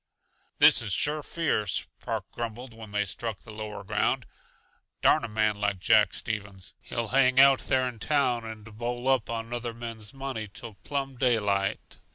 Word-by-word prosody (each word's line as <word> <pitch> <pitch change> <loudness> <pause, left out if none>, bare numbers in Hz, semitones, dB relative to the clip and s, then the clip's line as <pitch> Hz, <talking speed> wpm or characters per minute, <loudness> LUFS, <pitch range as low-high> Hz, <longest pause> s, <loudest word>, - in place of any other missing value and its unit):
"This - - +7
is 105 -4 -2
sure 150 +9 +1
fierce," 140 - -1
Park - - -3
grumbled 120 +1 -6
when 110 -1 -10
they 105 0 0
struck 110 +2 -3
the 110 - -11
lower 105 -1 -6
ground. - - 0 0.8
"Darn - - +5
a - - -2
man 110 -1 +1
like 105 -2 +1
Jack 105 +3 +4
Stevens! 100 -4 -5
He'll 115 -2 -4
hang 130 -1 +4
out 135 -1 +7
there 130 -1 +1
in 120 -3 -7
town 130 -3 +1
and 110 -1 -8
bowl 120 +3 -4
up 130 -4 +2
on 115 0 -4
other 120 -1 -3
men's 115 -3 -6
money 135 -5 -5
till 115 +2 -9
plumb 135 -2 -3
daylight. 105 -6 0
115 Hz, 170 wpm, -28 LUFS, 105-125 Hz, 0.8 s, This